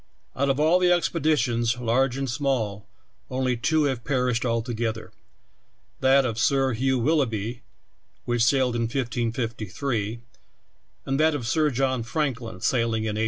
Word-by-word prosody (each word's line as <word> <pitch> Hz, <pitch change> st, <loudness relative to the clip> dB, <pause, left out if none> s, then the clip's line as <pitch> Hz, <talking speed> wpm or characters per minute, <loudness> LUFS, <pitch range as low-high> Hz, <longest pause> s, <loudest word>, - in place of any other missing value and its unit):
Out 140 Hz, +1 st, 0 dB
of 135 Hz, +1 st, +1 dB
all 160 Hz, +4 st, +4 dB
the 180 Hz, -1 st, +3 dB
expeditions, 130 Hz, -9 st, +1 dB
large 125 Hz, +2 st, +1 dB
and 135 Hz, 0 st, -2 dB
small, 120 Hz, -6 st, -2 dB, 0.4 s
onl}^ 130 Hz, -2 st, -1 dB
two 160 Hz, +2 st, +2 dB
have 130 Hz, -5 st, -1 dB
perished 125 Hz, -3 st, 0 dB
altogether 115 Hz, -2 st, -2 dB, 0.4 s
— -, -, -42 dB
that 135 Hz, +1 st, +5 dB
of 115 Hz, -3 st, -2 dB
Sir 135 Hz, 0 st, +2 dB
Hugh 130 Hz, +3 st, +1 dB
Willoughby, 120 Hz, -5 st, 0 dB, 0.6 s
which 120 Hz, -1 st, +1 dB
sailed 125 Hz, 0 st, +2 dB
in 115 Hz, -1 st, -1 dB
1553, 115 Hz, -2 st, -2 dB, 0.9 s
and 135 Hz, +1 st, -1 dB
that 155 Hz, 0 st, +3 dB
of 125 Hz, -5 st, -4 dB
Sir 155 Hz, +4 st, +2 dB
John 130 Hz, -1 st, 0 dB
Franklin, 120 Hz, -, -3 dB
sailing 115 Hz, -3 st, +1 dB
in 110 Hz, -, -1 dB
1845. 105 Hz, -, -3 dB
125 Hz, 145 wpm, -25 LUFS, 115-135 Hz, 0.9 s, that